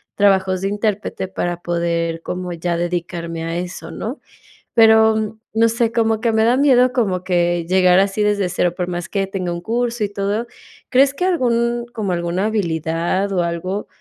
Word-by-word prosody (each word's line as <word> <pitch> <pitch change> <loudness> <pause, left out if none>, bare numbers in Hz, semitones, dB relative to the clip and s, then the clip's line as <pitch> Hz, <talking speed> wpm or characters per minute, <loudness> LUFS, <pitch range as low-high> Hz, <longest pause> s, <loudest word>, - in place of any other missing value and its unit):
trabajos 190 -2 +2
de 195 - 0
intérprete 205 -2 -2
para 175 -2 -3
poder 170 -1 -1
como 180 0 -4
ya 170 0 -2
dedicarme 170 -1 -3
a 165 +1 -3
eso, 180 +1 -6
¿no? 240 +7 -5 0.5
Pero 220 -1 +4
no 225 +1 +3
sé, 230 0 0
como 225 -2 +1
que 235 -2 +2
me 220 0 +3
da 240 +3 +3
miedo 255 -3 +4
como 195 -8 0
que 175 -2 +1
llegar 185 0 +4
así 195 +2 +1
desde 205 -3 +1
cero, 175 -1 0
por 180 -2 -2
más 175 -1 -4
que 195 -1 0
tenga 190 -2 -4
un 170 - -5
curso 235 +3 -1
y 205 - -1
todo, 205 +3 -2 0.4
¿crees 270 +1 +4
que 360 - -1
algún 240 -8 +1
como 215 -5 -2
alguna 175 +2 -1
habilidad 170 -1 -1
o 185 -2 +1
algo 175 +4 -3
195 Hz, 175 wpm, -19 LUFS, 175-220 Hz, 0.5 s, Pero